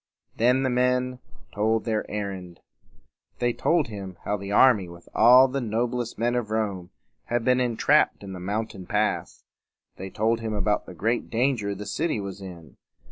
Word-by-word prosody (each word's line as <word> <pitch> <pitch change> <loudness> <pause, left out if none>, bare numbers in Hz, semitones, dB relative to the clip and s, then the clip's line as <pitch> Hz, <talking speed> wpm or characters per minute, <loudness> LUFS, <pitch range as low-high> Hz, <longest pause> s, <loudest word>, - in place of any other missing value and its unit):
Then 125 +3 +3
the 130 - +1
men 125 0 +1 0.3
told 110 +2 +1
their 110 -2 -2
errand. 95 -4 -5 0.8
They 120 -1 0
told 165 +1 +1
him 95 -4 -7
how 105 - 0
the 100 0 -6
army 105 -5 +5
with 85 0 -13
all 125 +4 +7
the 135 +1 -3
noblest 120 +1 -2
men 120 +2 0
of 120 -3 -2
Rome 100 -5 -2 0.4
had 120 -1 -1
been 125 0 +3
en 120 -3 -1
trapped - - +3
in 95 -1 -7
the 90 - -7
mountain 100 0 -4
pass. 105 +1 -1 0.5
They 95 +1 -6
told 110 +4 0
him 110 -1 -3
about 105 0 0
the 90 - -10
great 115 +8 -1
danger 115 -4 0
the 105 +2 -7
city 155 +4 -1
was 100 -1 -6
in. 85 -7 -11
110 Hz, 175 wpm, -25 LUFS, 100-120 Hz, 0.8 s, all